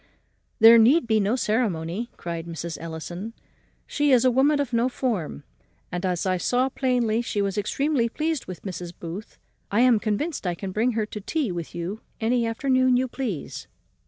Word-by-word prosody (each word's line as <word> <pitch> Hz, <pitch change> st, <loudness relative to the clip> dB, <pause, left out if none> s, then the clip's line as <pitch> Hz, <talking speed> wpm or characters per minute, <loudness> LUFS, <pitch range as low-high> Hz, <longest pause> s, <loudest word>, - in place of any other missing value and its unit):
"There 230 Hz, 0 st, +9 dB
need 260 Hz, +8 st, +5 dB
be 220 Hz, -1 st, +2 dB
no 210 Hz, +4 st, +1 dB
ceremony," 215 Hz, -3 st, -1 dB
cried 170 Hz, -1 st, -5 dB
Mrs. 170 Hz, 0 st, -5 dB
Ellison; 175 Hz, +6 st, -6 dB, 0.5 s
"she 295 Hz, 0 st, 0 dB
is 255 Hz, -1 st, +5 dB
a 255 Hz, -, +5 dB
woman 285 Hz, +4 st, +3 dB
of 270 Hz, -4 st, -2 dB
no 235 Hz, +2 st, +2 dB
form; 220 Hz, -, -3 dB, 0.5 s
and, 180 Hz, +1 st, -3 dB
as 180 Hz, 0 st, -1 dB
I 185 Hz, -1 st, +1 dB
saw 250 Hz, +8 st, +1 dB
plainly 245 Hz, -4 st, +1 dB
she 220 Hz, -3 st, -3 dB
was 200 Hz, -1 st, 0 dB
extremely 235 Hz, +4 st, 0 dB
pleased 310 Hz, +2 st, -2 dB
with 185 Hz, -1 st, -8 dB
Mrs. 175 Hz, -2 st, -6 dB
Booth, 175 Hz, +5 st, -7 dB, 0.3 s
I 210 Hz, +4 st, +2 dB
am 245 Hz, -3 st, +5 dB
convinced 215 Hz, -, -2 dB
I 175 Hz, -, 0 dB
can 190 Hz, +2 st, -5 dB
bring 230 Hz, +5 st, +1 dB
her 220 Hz, -1 st, 0 dB
to 210 Hz, -, -7 dB
drink 200 Hz, -, -16 dB
tea 300 Hz, -, 0 dB
with 170 Hz, -1 st, -6 dB
you 180 Hz, +6 st, -4 dB, 0.2 s
any 235 Hz, +1 st, +1 dB
afternoon 255 Hz, +2 st, +2 dB
you 260 Hz, +1 st, +1 dB
please." 235 Hz, -, -5 dB
225 Hz, 185 wpm, -25 LUFS, 185-255 Hz, 0.5 s, There